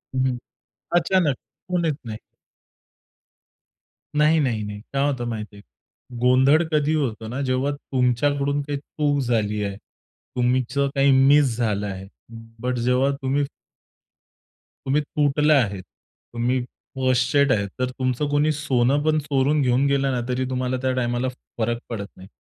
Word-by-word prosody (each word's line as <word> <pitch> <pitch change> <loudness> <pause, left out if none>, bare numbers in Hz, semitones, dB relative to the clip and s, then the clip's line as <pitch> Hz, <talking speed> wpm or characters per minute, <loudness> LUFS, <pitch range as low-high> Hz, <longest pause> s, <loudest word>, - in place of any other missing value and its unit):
हं, 130 0 +2
हं. 125 - -2 0.6
अचानक. 170 -5 +1 0.3
कोण 180 -2 0
येत 160 -3 +1
नाही. 110 -2 -6 2.0
नाही, 150 +2 +4
नाही, 120 -7 0
नाही. 105 0 -6
काय 140 +1 +1
होतं 130 -4 -3
माहिती 110 -2 -6
आहे? 100 - -13 0.6
गोंधळ 130 +5 +5
कधी 150 0 +2
होतो 115 -7 -2
ना, 125 +5 -4
जेव्हा 130 +1 0
तुमच्याकडून 140 +2 0
काही 145 0 -4
चूक 145 0 -1
झाली 105 -4 0
आहे, 100 -1 -4
तुमचं 125 +5 -2
काही 140 0 +4 0.2
मिस 140 -4 +4
झालं 105 -4 -1
आहे. 95 -1 -6 0.5
बट 125 +1 -1
जेव्हा 125 +3 +2
तुम्ही 135 +2 +1 1.4
तुम्ही 140 +3 +2
तुटल्या 150 +1 +2
आहेत, 100 -4 -4 0.5
तुम्ही 120 +2 0 0.4
फ्रस्टेट 130 +2 +2
आहे. 100 -4 +1
तर 125 0 0
तुमचं 130 +2 -1
कोणी 145 +1 +2
सोनंपण 145 +1 +1
चोरून 145 0 +1
घेऊन 130 +1 +2
गेलं 140 -1 +1
ना, 125 - -1
तरी 130 +1 -1
तुम्हाला 130 0 -1
त्या 130 - +1
टाईमाला 120 0 0 0.3
फरक 115 +1 0
पडत 110 -4 -4
नाही. 95 +1 -13
130 Hz, 140 wpm, -23 LUFS, 120-145 Hz, 2.0 s, गोंधळ